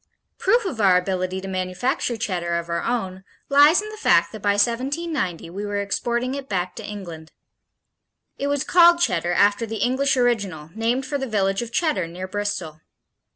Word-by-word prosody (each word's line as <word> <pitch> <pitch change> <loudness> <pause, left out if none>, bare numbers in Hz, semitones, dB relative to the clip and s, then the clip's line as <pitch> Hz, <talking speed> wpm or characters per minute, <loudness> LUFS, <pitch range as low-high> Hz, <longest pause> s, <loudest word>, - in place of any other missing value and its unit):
Proof 470 -2 +2
of 270 - -3
our 190 -3 +5
ability 185 0 -2
to 195 - -7
manufacture 190 - -2
Cheddar 175 -5 -2
of 170 0 -3
our 170 0 -1
own 190 -6 -3 0.3
lies 290 +7 +6
in 425 - -7
the 430 - -9
fact 170 - +4
that 215 - -9
by 205 0 +2
1790 240 - -1
we 200 +3 -5
were 205 0 -2
exporting 240 +5 -1
it 275 -1 -6
back 180 -2 -2
to - - -6
England. 170 -6 -8 1.1
It 280 - -3
was 285 -1 0
called 345 -1 +6
Cheddar 175 - +1
after 205 +4 +3
the 225 - -5
English 260 +5 +1
original 200 -11 0
named 235 +5 -1
for 285 +1 -3
the 265 - -3
village 195 -2 0
of 235 -1 -6
Cheddar 235 - 0
near 180 +3 -7
Bristol. 185 -6 -4
205 Hz, 180 wpm, -23 LUFS, 185-260 Hz, 1.1 s, lies